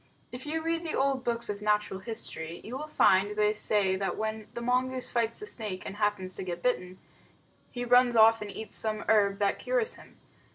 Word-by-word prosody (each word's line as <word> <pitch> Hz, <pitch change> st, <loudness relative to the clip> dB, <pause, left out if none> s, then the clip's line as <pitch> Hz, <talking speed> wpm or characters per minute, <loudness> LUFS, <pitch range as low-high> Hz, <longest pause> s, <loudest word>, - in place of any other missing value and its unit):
If 250 Hz, +4 st, -8 dB
you 320 Hz, +1 st, -2 dB
read 330 Hz, +1 st, -1 dB
the 320 Hz, -, -3 dB
old 270 Hz, -1 st, +1 dB
books 235 Hz, -1 st, -1 dB
of 205 Hz, 0 st, -4 dB
natural 210 Hz, -2 st, 0 dB
history, 185 Hz, -6 st, -5 dB
you 240 Hz, -, -7 dB
will 300 Hz, +3 st, -5 dB
find 195 Hz, -, +3 dB
they 210 Hz, 0 st, +3 dB
say 205 Hz, -3 st, +1 dB
that 195 Hz, 0 st, -2 dB
when 220 Hz, 0 st, -3 dB
the -, -, -3 dB
mongoose 255 Hz, +1 st, 0 dB
fights 230 Hz, -1 st, 0 dB
the -, -, -5 dB
snake 210 Hz, -, -5 dB
and 195 Hz, -, -6 dB
happens 205 Hz, -3 st, -1 dB
to -, -, -4 dB
get 175 Hz, -1 st, -5 dB
bitten, 185 Hz, -7 st, -1 dB, 0.7 s
he 245 Hz, 0 st, -4 dB
runs 245 Hz, 0 st, +5 dB
off 225 Hz, 0 st, +6 dB
and 210 Hz, -, -5 dB
eats 215 Hz, +2 st, -5 dB
some 215 Hz, -1 st, -1 dB
herb 200 Hz, -2 st, +3 dB
that 200 Hz, -1 st, 0 dB
cures -, -, 0 dB
him. -, -, -17 dB
220 Hz, 205 wpm, -29 LUFS, 200-250 Hz, 0.7 s, off